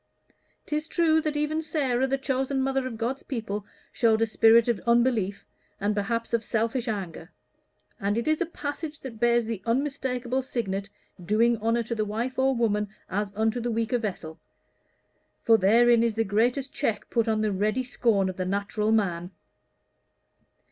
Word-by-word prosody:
'Tis 305 +1 -2
true 320 -2 +3
that 305 -1 -2
even 305 +1 0
Sara, 265 -5 0
the 270 +1 0
chosen 270 0 -1
mother 270 0 0
of 230 -3 -6
God's 245 +4 -2
people, 210 -5 -4 0.2
showed 225 -2 +2
a - - +4
spirit 225 +1 +5
of 235 -4 +1
unbelief, 235 -5 +2 0.3
and 205 +1 0
perhaps 230 +3 -2
of 230 -1 +1
selfish 230 +3 -1
anger; 185 -6 -4 0.7
and 205 +2 0
it 235 - -2
is 310 +1 +1
a 350 - +1
passage 300 -1 -5
that 235 -5 -8
bears 235 0 +3
the 220 -3 -4
unmistakable 255 0 -1
signet, 200 -6 -3 0.3
'doing 225 +6 +3
honor 230 +2 0
to 230 - -4
the 220 -2 0
wife 230 +5 -3
or 265 0 +3
woman, 210 -3 0 0.2
as 205 +1 -1
unto 220 +3 +1
the 240 0 -2
weaker 230 +1 0
vessel.' 175 -7 -5 1.0
For 225 -1 +5
therein 230 +4 +5
is 230 -2 +1
the 225 - +2
greatest 245 +7 0
check 220 -8 -2
put 230 -1 +1
on 220 -1 +1
the 215 -1 +1
ready 215 +6 0
scorn 225 -6 +1
of 185 - -5
the 185 - -2
natural 200 +3 -1
man." 180 -5 0
230 Hz, 170 wpm, -26 LUFS, 210-260 Hz, 1.0 s, spirit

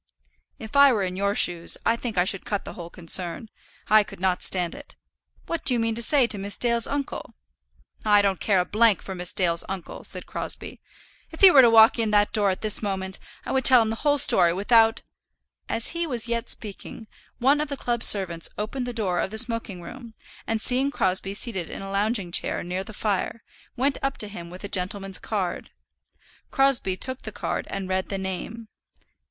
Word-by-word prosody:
"If 220 +4 -10
I 280 -1 +7
were 210 -5 0
in 185 -1 -3
your 200 +1 -1
shoes 170 -4 +2
I 230 - +3
think 235 -3 -6
I 180 - +3
should 195 0 -3
cut 205 -2 -3
the - - -8
whole 170 -1 -9
concern. 175 +5 0 0.4
I 215 0 +6
could 205 - -12
not 185 -1 0
stand 180 -3 0
it. - - -12 0.5
What 335 - -4
do 265 -2 +3
you - - 0
mean 225 0 0
to 235 - 0
say 270 +2 +4
to 215 -3 -1
Miss 200 0 -3
Dale's 235 -1 +1
uncle?" 280 -1 -5 0.7
"I 205 -1 +4
don't 195 -2 0
care 200 -3 +2
a 220 +1 +3
for 190 - -9
Miss 180 -1 +2
Dale's 170 -3 +1
uncle," 190 -3 -7
said - - -2
Crosbie. - - -5 0.5
"If 320 - -12
he 385 -2 +9
were 275 - +8
to 240 - +6
walk 225 +1 +6
in 225 -1 0
at - - +7
that 205 0 +1
door 200 -3 +2
this 215 +1 +1
moment, 190 -2 -3 0.3
I - - -4
would 265 0 0
tell 255 0 +7
him 220 -1 0
the 225 - -4
whole 290 +3 +1
story, 170 -10 +5
without 225 +4 +3 0.3
" - - -49
As 225 - -1
he 335 0 -2
was 240 -5 +1
yet 235 0 -3
speaking, 215 +1 -6 0.3
one 275 +4 +2
of 300 - -2
the 280 - -4
club 240 -2 -2
servants 180 -7 +1
opened 245 +4 -4
the 245 - -4
door 195 -6 -1
of - - -1
the 220 - -6
smoking 225 -6 -1
room, 235 +1 -11 0.3
and 225 -1 -1
seeing 260 +5 +1
Crosbie 195 -5 -1
seated 195 -7 -2
in - - -7
a 195 - -7
lounging 200 -2 -1
chair - - -1
near 180 +2 -4
the 220 - -11
fire, 210 +1 -3 0.3
went 270 +2 0
up 275 0 -2
to 210 - -2
him 175 -5 -9
with 180 +3 -11
a - - -4
gentleman's 195 0 -2
card. 195 -5 -4 0.8
Crosbie 270 -9 +1
took 260 +4 -3
the - - -7
card - - -4
and 195 -1 -5
read 185 0 -2
the 195 - -3
name. 190 +4 -6
210 Hz, 210 wpm, -24 LUFS, 190-235 Hz, 0.8 s, he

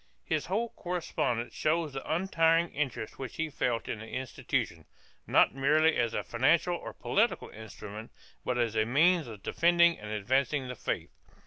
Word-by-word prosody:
2 - - +1
His 150 -4 0
whole 225 +5 0
correspondence 165 - -2
shows 155 -1 0
the 135 - -5
untiring 165 -1 +2
interest 135 -6 -3
which 130 -3 -6
he 160 -1 -2
felt 120 -4 -1
in 110 - -3
the 110 - -9
institution, 130 -1 -3 0.4
not - - +4
merely 155 +4 +3
as 115 -1 0
a - - -1
financial 160 +9 +2
or - - -7
political 220 +4 0
instrument, 110 0 -9 0.3
but 125 - -1
as 115 -2 0
a 110 - +3
means 155 +7 +3
of 105 -4 -10
defending 170 0 +4
and 105 - -8
advancing 130 +6 0
the 125 - -5
faith. - - -3
135 Hz, 165 wpm, -30 LUFS, 115-165 Hz, 0.4 s, not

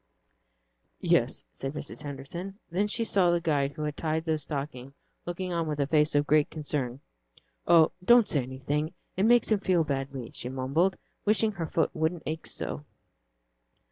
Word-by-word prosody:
"Yes," - - +2
said 135 +1 -4
Mrs. 150 - -5
Henderson. 150 +7 -6
Then 195 +4 +1
she 230 +3 0
saw 195 -5 +3
the 175 0 +3
guide 145 -4 0
who 155 - -5
had 150 -1 -2
tied 160 0 -1
the 160 -2 +1
stocking 140 -2 -5 0.3
looking 180 +1 -3
on 165 -1 0
with 150 -1 -3
a 140 - +3
face 150 +1 +2
of 145 0 +3
great 150 0 +3
concern. 140 -4 -3 0.7
"Oh, 165 -2 +6
don't 240 +2 +6
say 145 - +2
anything, 140 +5 -3 0.2
it 190 - +2
makes 240 -1 +4
him 215 - +4
feel 185 -4 +2
badly," 135 -4 -4
she 125 - -5
mumbled, 140 +8 +1 0.3
wishing 215 +1 +3
her 175 -5 -4
foot - - +1
wouldn't 160 +1 -1
ache 155 +1 -4
so. 70 +2 -4
155 Hz, 170 wpm, -28 LUFS, 140-175 Hz, 0.7 s, Oh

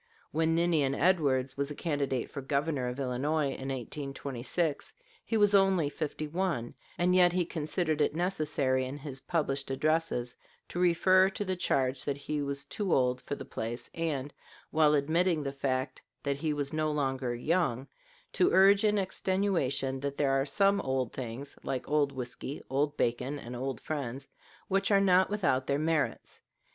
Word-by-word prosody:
When 160 +1 +1
Ninian 165 -5 +2
Edwards 140 -7 +2
was 140 0 -2
a 150 - -6
candidate 140 -6 -1
for 140 - -5
Governor 140 -1 -1
of 125 +2 -4
Illinois 140 +3 0
in 135 0 -6
1826, 135 +3 -3 0.3
he 225 - -1
was 205 -1 +4
only 195 -6 +4
fifty 155 0 -4
one, 165 -8 -2 0.2
and 180 +1 +2
yet 180 -1 +5
he 180 -1 +1
considered 155 -1 -1
it 145 - +1
necessary 155 -7 +1
in 130 +2 -5
his 135 -2 -7
published 140 -5 -1
addresses 150 -3 0 0.3
to 175 - -4
refer 185 +2 +5
to 205 +1 -4
the 185 -1 -1
charge 135 -6 0
that 140 -1 -1
he 145 +1 -3
was 140 -1 -4
too 200 +4 -3
old 125 -2 +2
for 145 - -4
the - - -8
place, 115 +2 -5
and, 150 -4 -2 0.4
while 155 -1 +4
admitting 160 +3 +2
the 140 - -2
fact 130 -1 -2 0.2
that 140 -1 -1
he 155 +1 -1
was 145 -1 -3
no 155 0 0
longer 135 -4 -1
young, 135 -2 0 0.5
to 360 - +3
urge 195 +2 +6
in 210 -1 +3
extenuation 185 -9 0
that 140 +1 -4
there 140 -2 +2
are 135 +1 +1
some 200 +6 +3
old 130 -2 -1
things, 130 +3 -6
like 130 - -3
old 145 -1 +2
whisky, 130 +2 -6
old 145 +2 0
bacon, 125 +4 0
and 125 -3 -8
old 130 -1 -3
friends, 140 -3 -4 0.4
which 195 0 +1
are 200 -2 +5
not 185 -1 +4
without 175 -11 +1
their 140 - +1
merits. 155 0 -1
145 Hz, 170 wpm, -30 LUFS, 135-170 Hz, 0.5 s, urge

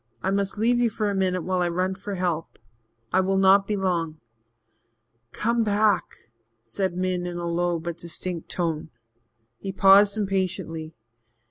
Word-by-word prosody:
I 190 - +1
must 200 0 -1
leave 240 +3 +2
you 240 -1 +3
for 215 -1 -1
a - - -2
minute 185 -2 0
while 185 +1 0
I 175 - +1
run 185 +2 0
for 195 +1 -6
help 175 -3 -2 0.6
I 185 - +4
will 190 +1 +1
not 195 +1 +5
be 210 - 0
long." 170 -5 -1 1.1
"Come 230 - 0
back," 210 - 0 0.3
said 175 - -2
Min 180 -1 -1
in 175 0 -5
a 175 - -4
low 170 0 0
but 170 0 -6
distinct 170 0 -5
tone. 165 -3 -2 0.7
He 195 - -4
paused 195 +2 +6
impatiently. 185 -5 -2
185 Hz, 155 wpm, -25 LUFS, 175-200 Hz, 1.1 s, paused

